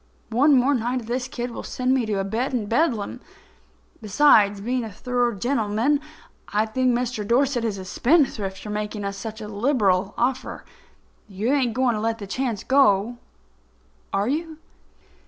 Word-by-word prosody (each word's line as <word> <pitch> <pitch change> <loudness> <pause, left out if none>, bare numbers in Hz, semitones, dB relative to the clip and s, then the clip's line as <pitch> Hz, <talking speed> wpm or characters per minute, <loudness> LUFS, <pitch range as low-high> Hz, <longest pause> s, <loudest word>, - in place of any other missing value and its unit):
One 275 +6 +4
more 260 +3 +3
night 245 0 -1
of - - -11
this 250 +2 -2
kid 245 -1 -5
will - - -6
send 255 0 -1
me 255 -4 +1
to 210 -2 -1
a - - 0
bed 235 +7 -2
in 225 -4 -1
Bedlam. 230 -2 0 0.8
Besides 210 -3 +4
being 245 +4 -2
a 220 - -6
thorough 245 +2 -1
gentleman, 235 +4 +1 0.5
I 210 +1 +1
think 255 +4 0
Mr. 240 -2 -1
Dorset 245 +3 +1
is 215 -3 -2
a 190 - -7
spendthrift 220 - +1
for 210 - -6
making 210 0 -4
us 200 0 -3
such 220 +2 -7
a 210 - -6
liberal 205 -4 +1
offer. 255 +2 -2 0.6
You 210 +6 -1
ain't 250 -6 +1
going 255 -1 +2
to 210 - -3
let 225 0 -1
the 205 - -7
chance 235 0 -3
go, 240 -4 +3 0.9
are 200 +2 0
you?" 315 +3 -2
235 Hz, 170 wpm, -23 LUFS, 210-255 Hz, 0.9 s, One